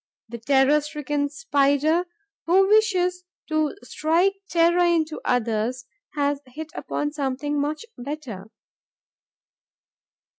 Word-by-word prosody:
The 235 0 -7
terror 275 +4 +3
stricken 295 -1 -2
Spider, 295 - +1 0.4
who 380 +3 +5
wishes 365 -4 +2 0.3
to 310 +2 0
strike 335 +5 +1 0.2
terror 340 +1 +3
into 325 -3 +1
others, 240 +1 -1 0.3
has 285 -1 0
hit 305 +5 -8
upon 295 0 -3
something 290 0 -2
much 305 +9 -3
better. 245 -7 -6
295 Hz, 100 wpm, -24 LUFS, 275-335 Hz, 0.4 s, who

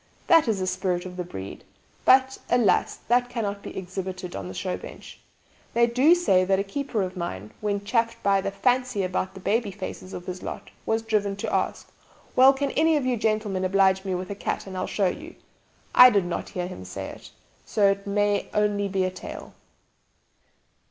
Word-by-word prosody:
That 330 -6 +5
is 220 -3 +1
the 185 - -1
spirit 185 -1 -1
of 180 -1 -7
the 180 - -3
breed; 95 - -8 0.4
but, 265 0 +5
alas, 230 -7 +3
that 245 +1 +3
cannot 205 -4 -3
be - - -8
exhibited 185 0 -5
on 95 -2 -5
the 95 - -7
show 185 -1 -2
bench. - - -11 0.6
They 235 0 +5
do 255 +8 +5
say 195 - +3
that 190 +1 +2
a 195 - 0
keeper 225 0 -2
of 185 0 -5
mine, 105 - -5
when 205 -1 -2
chaffed 230 +1 +1
by 195 -1 +3
the 195 - -2
'fancy' 250 +1 +1
about 185 +1 -2
the - - -8
baby 215 +3 0
faces 190 -1 -7
of 175 - -7
his 180 0 -6
'lot,' - - -7 0.2
was 225 0 +1
driven 210 -3 0
to 200 - -4
ask, - - -1 0.4
'Well, 260 +1 +8
can 275 +1 -2
any 320 0 +3
of 280 - -1
you 255 -1 +1
gentlemen 215 -4 0
oblige 190 0 +3
me 190 -2 -2
with 185 +2 -5
a - - -4
cat, - - -3
and 190 -1 -8
I'll 185 - -2
show 200 - 0
you?' 315 - -3 0.6
I 250 - +10
did 200 -6 +2
not 175 - -4
hear 180 -1 -3
him 175 - -8
say 90 0 -6
it, - - -11 0.3
so 205 -2 +2
it 200 +1 -5
may 205 0 +1
only 205 -1 +1
be 190 -1 0
a 185 - 0
tale. 185 - -9
200 Hz, 200 wpm, -25 LUFS, 185-230 Hz, 0.6 s, I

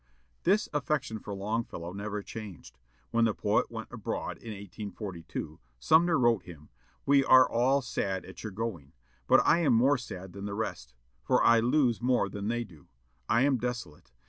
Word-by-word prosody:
This 205 +4 +3
affection 140 -5 -1
for 105 - -8
Longfellow 100 -4 -4
never 105 +1 -4
changed. 105 -7 -9 0.3
When 115 -1 +3
the 110 -3 0
poet - - +1
went - - -7
abroad - - -4
in 115 - -10
1842, 100 -5 -7 0.2
Sumner 160 - +4
wrote 120 -5 +3
him, 80 -5 -13 0.4
"We 140 0 +5
are 130 -2 +7
all 130 +4 +2
sad 95 -5 -2
at - - -11
your 110 - -5
going; 95 -9 -5 0.3
but - - +5
I 170 - +5
am 150 -7 +3
more 130 +4 +4
sad 95 -6 -8
than 100 +1 -7
the 100 -1 -4
rest, 60 - -5 0.3
for - - +2
I 115 - +6
lose 120 0 +2
more 125 -5 +2
than 100 +1 -5
they 120 +1 -1
do. 80 -10 -17 0.4
I 115 - +4
am 135 -3 +2
desolate. 115 - -5
110 Hz, 170 wpm, -29 LUFS, 95-125 Hz, 0.4 s, are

